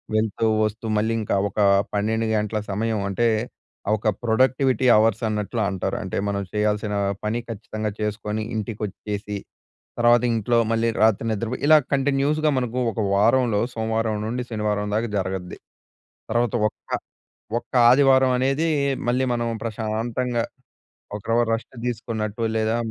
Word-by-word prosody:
వెళ్తూ 110 +1 0 0.2
వస్తూ 110 +2 -4
మళ్ళీ 110 +2 +1
ఇంకా 105 - -1
ఒకా 105 +1 +1 0.3
12 110 +2 0
గంటల 105 0 -1
సమయం. 110 +2 -1
అంటే 115 +5 +1 0.7
ఒక 110 - -4 0.2
ప్రొడక్టివిటీ 130 +2 +2
అవర్స్ 110 +1 +2
అన్నట్లు 105 +2 -2
అంటారు. 95 -3 -2
అంటే - - -4
మనం 100 0 -1
చెయ్యాల్సినా 105 0 0 0.3
పని 110 +3 0
ఖచ్చితంగా 110 -1 -4
చేసుకొని 105 0 -2
ఇంటికొచ్చేసి 105 -1 -4 0.6
తర్వాత 120 0 +5
ఇంట్లో 115 +2 +1
మళ్ళీ 115 +1 +1
రాత్రి 110 -1 +3
నిద్రపోయి 115 +3 -3
ఇలా 155 +1 +8
కంటిన్యూస్‍గా 145 +3 +2
మనకు 125 -1 -2
ఒక 110 - -4
వారంలో 115 +1 +3
సోమవారం 110 -1 -1
నుండి 125 +3 -2
శనివారం 105 -2 -1
దాకా 115 +2 0
జరగద్ది. 95 -1 -4 0.7
తర్వాత 120 0 +1
ఒక్క - - -16 0.7
ఒక్క - - -26 0.2
ఆదివారమనేదీ 135 +3 +4 0.4
మళ్ళీ 125 +2 +2
మనం 120 -1 -1 0.2
ప్రశాంతంగా 115 +2 -2 0.7
ఒక్కరవ 115 +3 0
రెస్ట్ 115 +3 -3
తీసుకున్నట్టు 110 -2 -3
లేదా 110 +1 +1
110 Hz, 125 wpm, -23 LUFS, 105-120 Hz, 0.7 s, ఇలా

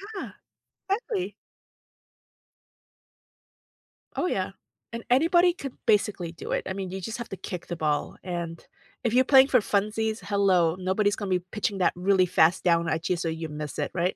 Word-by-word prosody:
Yeah. 390 - -5 0.6
Exactly. 400 -2 -2 2.8
Oh, - - 0
yeah, 190 - -1 0.4
and 230 0 -5
anybody 345 +7 +4
could 275 -7 -7
basically 205 -6 +1
do 165 - -8
it. - - 0
I 190 - -2
mean, 190 -1 -4
you 190 0 -5
just 225 +4 -5
have 240 -1 -7
to 195 - -6
kick 180 -2 -7
the 175 - -4
ball, 150 -2 -1
and, 170 -2 -5 0.4
if 230 - 0
you're 255 +1 +5
playing 270 0 +7
for 255 - +4
funsies, 215 +2 0
hello? 185 -5 +2
Nobody's 190 +2 +1
gonna 200 -2 -5
be 185 -1 +2
pitching 210 -1 -2
that 185 - +2
really 185 +1 +3
fast 170 0 +3
down 170 -2 +2
at 160 +2 -1
you 180 - +2
so 165 -1 -2
you 160 0 -4
miss 150 -1 -6
it, - - -2
right? 180 +1 0
190 Hz, 175 wpm, -26 LUFS, 175-225 Hz, 2.8 s, playing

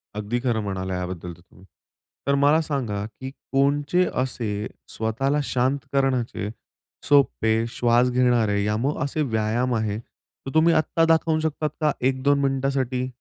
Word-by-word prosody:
अगदी 105 +3 -2
खरं 120 -3 0
म्हणाला 95 -2 -3
याबद्दल 90 -1 -5
तर 85 - -18
तुम्ही. 90 +2 -20 0.6
तर, 140 - +3
मला 145 +3 +4
सांगा, 120 -10 -2
की 130 +4 -8 0.2
कोणचे 145 +6 +2
असे 115 -5 -2 0.2
स्वतःला 135 +6 -1
शांत 130 +2 +1 0.2
करण्याचे 130 -6 0 0.6
सोपे, 115 -6 +3
श्वास 120 +1 +2
घेणारे, 120 -5 +2
या 105 +1 0
मग 135 +6 -1
असे 145 +2 -2
व्यायाम 120 0 0
आहे? 110 -2 -1
तर, 135 +3 -14
तुम्ही 165 +1 +5
आत्ता 165 +1 +2
दाखवू 160 -1 +2
शकतात 155 -1 -1
का 150 -1 +3 0.2
1-2 135 +2 +2
मिनिटासाठी? 135 -2 0
125 Hz, 140 wpm, -24 LUFS, 110-140 Hz, 0.6 s, तुम्ही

